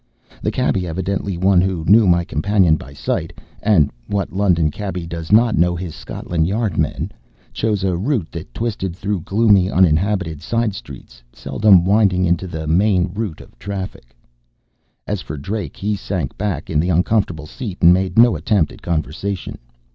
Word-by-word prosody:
The -, -, 0 dB
cabby, 90 Hz, -2 st, 0 dB
evidently 95 Hz, +2 st, -3 dB
one 95 Hz, 0 st, +4 dB
who 90 Hz, -4 st, -1 dB
knew 105 Hz, +2 st, +6 dB
my 85 Hz, -1 st, +4 dB
companion 100 Hz, -4 st, +2 dB
by 70 Hz, -2 st, -9 dB
sight 65 Hz, -2 st, -3 dB, 0.3 s
(and 100 Hz, -9 st, +3 dB, 0.2 s
what 100 Hz, -3 st, -2 dB
London 90 Hz, -6 st, +2 dB
cabby 90 Hz, -1 st, -5 dB
does 85 Hz, 0 st, -6 dB
not 115 Hz, +1 st, +5 dB
know 85 Hz, +1 st, +2 dB
his 85 Hz, -2 st, -5 dB
Scotland 80 Hz, -2 st, -3 dB
Yard 105 Hz, -2 st, -1 dB
men!) -, -, -1 dB, 0.4 s
chose 105 Hz, -3 st, -1 dB
a 95 Hz, -2 st, +1 dB
route 100 Hz, -, -1 dB
that 85 Hz, -, -8 dB
twisted 105 Hz, -6 st, -3 dB
through 100 Hz, 0 st, -2 dB
gloomy, 100 Hz, -1 st, +3 dB
uninhabited 90 Hz, -2 st, +1 dB
side 115 Hz, +3 st, -1 dB
streets, 65 Hz, -8 st, -11 dB
seldom 95 Hz, -, +3 dB
winding 95 Hz, -2 st, +3 dB
into 90 Hz, +2 st, 0 dB
the 80 Hz, -2 st, -5 dB
main 90 Hz, +2 st, +2 dB
route 100 Hz, -6 st, -4 dB
of -, -, -18 dB
traffic. 95 Hz, -11 st, -7 dB, 0.9 s
As -, -, -3 dB
for 75 Hz, -, -7 dB
Drake, 95 Hz, +7 st, -5 dB
he 105 Hz, +1 st, -1 dB
sank 95 Hz, -2 st, -4 dB
back 95 Hz, -5 st, -3 dB
in 75 Hz, -, +2 dB
the 85 Hz, +4 st, +1 dB
uncomfortable 90 Hz, -2 st, +1 dB
seat 100 Hz, -, -7 dB
and 85 Hz, +1 st, +8 dB
made 95 Hz, 0 st, -1 dB
no 115 Hz, -3 st, +6 dB
attempt 85 Hz, +1 st, +1 dB
at -, -, -14 dB
conversation. 85 Hz, +4 st, -3 dB
95 Hz, 165 wpm, -19 LUFS, 85-100 Hz, 0.9 s, and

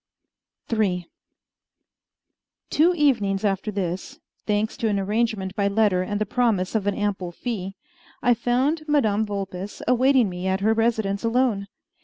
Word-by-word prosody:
III 185 Hz, -6 st, 0 dB, 1.6 s
Two 325 Hz, +4 st, +4 dB
evenings 220 Hz, -, +2 dB
after 195 Hz, +1 st, 0 dB
this, 190 Hz, -3 st, -4 dB, 0.3 s
thanks 210 Hz, +1 st, 0 dB
to 230 Hz, -, 0 dB
an 205 Hz, -2 st, +1 dB
arrangement 205 Hz, -1 st, -1 dB
by 200 Hz, -1 st, +1 dB
letter 200 Hz, -3 st, +2 dB
and 205 Hz, +2 st, -2 dB
the 215 Hz, -, 0 dB
promise 210 Hz, -5 st, 0 dB
of 210 Hz, -3 st, 0 dB
an 200 Hz, -, +1 dB
ample 195 Hz, -4 st, -2 dB
fee, 195 Hz, -1 st, -5 dB, 0.4 s
I 245 Hz, -, +4 dB
found 250 Hz, +7 st, +1 dB
Madame 220 Hz, -8 st, +2 dB
Vulpes 195 Hz, -1 st, -5 dB
awaiting 255 Hz, 0 st, +4 dB
me 180 Hz, 0 st, -4 dB
at 190 Hz, +1 st, 0 dB
her 220 Hz, +2 st, +3 dB
residence 220 Hz, -3 st, 0 dB
alone. 230 Hz, -4 st, +1 dB
210 Hz, 140 wpm, -24 LUFS, 195-235 Hz, 1.6 s, Two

